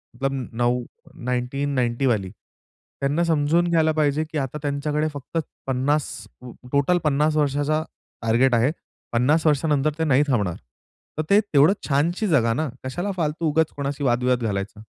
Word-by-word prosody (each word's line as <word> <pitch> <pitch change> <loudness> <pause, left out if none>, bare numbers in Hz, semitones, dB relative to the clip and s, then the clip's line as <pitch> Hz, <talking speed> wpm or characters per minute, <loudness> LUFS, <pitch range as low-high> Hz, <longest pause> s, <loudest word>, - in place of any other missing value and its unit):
मतलब 135 +2 -1 0.2
नऊ 120 +1 +1 0.4
1990 125 0 -1
वाली 105 -7 +1
त्यांना 140 - -5
समजून 165 +1 +2
घ्यायला 160 -2 +3
पाहिजे 150 +1 +2
की 155 - -3
आता 135 +1 -2
त्यांच्याकडे 150 +1 -1
फक्त 145 +3 -6 0.3
50 135 +3 +1 0.6
टोटल 145 +5 +3
50 150 +1 +2
वर्षाचा 145 +2 +1 0.4
टार्गेट 120 +3 +3
आहे. 120 +5 +3 0.4
50 145 +7 +2
वर्षानंतर 150 0 +2
ते - - +2
नाही 145 -2 +4
थांबणार. 105 -10 0 0.6
तर 155 - 0
ते 200 - +6
तेवढं 160 -3 +4 0.2
छानशी 165 +9 +1
जगा 120 - +3
ना, 155 +5 -1
कशाला 175 +10 -3
फालतू 160 0 -1
उगाच 160 +1 +1
कोणाशी 140 0 -3
वादविवाद 125 -1 +1
घालायचा. 105 0 -3
145 Hz, 140 wpm, -23 LUFS, 125-155 Hz, 0.6 s, ते